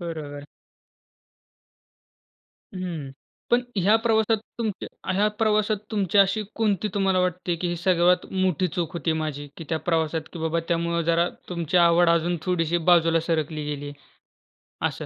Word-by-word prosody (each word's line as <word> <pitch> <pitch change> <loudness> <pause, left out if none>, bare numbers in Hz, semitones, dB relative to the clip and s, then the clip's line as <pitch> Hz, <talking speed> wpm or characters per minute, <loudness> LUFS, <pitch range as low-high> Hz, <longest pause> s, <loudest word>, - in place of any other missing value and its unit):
बरोबर. 150 -4 -6 2.3
हं. 170 -7 -5 0.4
पण 245 +1 +4
ह्या 195 +3 +4
प्रवासात 220 -1 +3 0.2
तुमच्या 210 -3 -4
ह्या 205 +3 +3
प्रवासात 215 -1 +2
तुमची 205 -3 +1
अशी 195 +2 +4
कोणती 215 -2 0
तुम्हाला 195 -2 +2
वाटते, 180 -1 -1
की 175 +1 -2
ही 175 - -2
सर्वात 180 0 +3
मोठी 185 -2 +1
चूक 175 -2 -2
होती 165 -1 0
माझी 145 -1 -5
की 165 - -8
त्या 160 - 0
प्रवासात 160 -1 0
की - - -7
बाबा 160 +1 0
त्यामुळं 170 0 0
जरा 170 +1 +2 0.2
तुमची 170 -1 -2
आवड 170 0 +5
अजून 170 +1 +2
थोडीशी 175 -2 0
बाजूला 165 -1 +4
सरकली 155 -2 -1
गेली? 145 -1 -5 1.0
असं. - - -6
175 Hz, 140 wpm, -25 LUFS, 165-190 Hz, 2.3 s, आवड